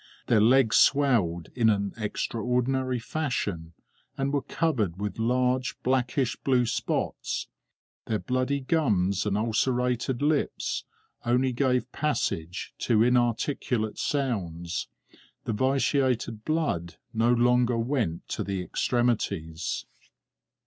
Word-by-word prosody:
Their 110 -3 +4
legs 120 -1 +5
swelled 115 - +3
in 115 -3 +3
an 100 -2 0
extraordinary 125 +4 -1
fashion, 115 - -3 0.4
and 135 +1 -1
were 140 - +2
covered 110 - -1
with 105 +2 -4
large 125 +2 +1
blackish 130 +1 +1
blue 125 -2 +2
spots; - - -2 0.6
their 110 - +1
bloody 130 +4 -1
gums 105 - +1
and 100 0 +1
ulcerated 125 +3 0
lips 150 0 0 0.4
only 125 +2 +2
gave 125 -1 +1
passage 90 - -2
to 110 -2 +3
inarticulate 120 -1 0
sounds; 90 - -2 0.6
the 115 - -1
vitiated 130 -2 +1
blood 150 - -1 0.2
no 115 +1 +3
longer 125 0 +3
went 115 - -1
to - - -2
the 100 -1 -3
extremities. 100 -9 -1
120 Hz, 105 wpm, -27 LUFS, 105-130 Hz, 0.6 s, legs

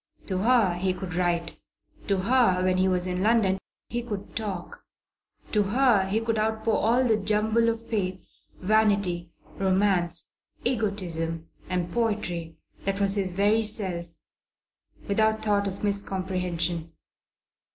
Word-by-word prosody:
To 185 -2 -1
her 225 -3 +4
he 185 +1 0
could 185 -3 -6
write; 170 -1 -1 0.5
to 200 - +2
her, 220 -4 +3
when 185 0 +2
he 185 +1 +3
was 180 -1 +1
in 180 0 -2
London, 205 -3 +3 0.3
he 240 +1 -2
could 210 -5 -6
talk; 195 -6 -5 0.7
to 210 - +3
her 210 -1 +3
he 205 +3 +1
could 225 -1 -1
outpour 220 +1 +1
all 235 +4 +3
the 225 -4 +3
jumble 215 +3 +2
of 230 0 -3
faith, 190 -5 -2 0.3
vanity, 200 -4 +1 0.3
romance, 185 -3 +1 0.3
egotism 175 -9 -2 0.2
and 180 -1 -1
poetry 190 -8 -2 0.3
that 195 0 -1
was 200 -1 +2
his 195 -2 -1
very 205 +4 +3
self, 190 -5 -2 1.0
without 220 +1 +2
thought 205 -2 +2
of 195 +1 -6
miscomprehension. 180 -4 -1
195 Hz, 130 wpm, -26 LUFS, 180-220 Hz, 1.0 s, her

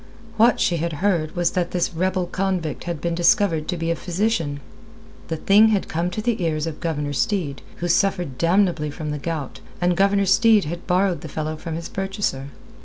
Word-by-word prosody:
What 230 +3 +4
she 175 -6 +2
had 165 +1 -2
heard 170 -1 0
was 175 -1 +1
that 180 -1 -1
this 175 -1 -1
rebel 185 +2 0
convict 180 -5 -2
had 170 -3 -3
been 170 0 -1
discovered 170 -2 +2
to 180 - -2
be 165 0 -1
a - - +1
physician. 175 -5 -1 0.7
The 160 - -3
thing 205 +6 +5
had 210 -3 +1
come 170 +2 -1
to 210 +4 -5
the 235 -4 0
ears 155 -2 0
of 160 -2 -5
Governor 150 -3 -2
Steed, 170 - -1
who 175 - -3
suffered 175 -6 +1
damnably 170 -3 +2
from 150 +1 -5
the 150 - -3
gout, 155 -3 -4 0.2
and 175 0 +2
Governor 200 +1 +3
Steed 215 +1 +4
had 170 +3 -6
borrowed 180 0 +1
the 160 - -8
fellow 155 +1 -3
from 160 0 -6
his 165 +1 -5
purchaser. 195 -8 -3
175 Hz, 195 wpm, -22 LUFS, 160-195 Hz, 0.7 s, thing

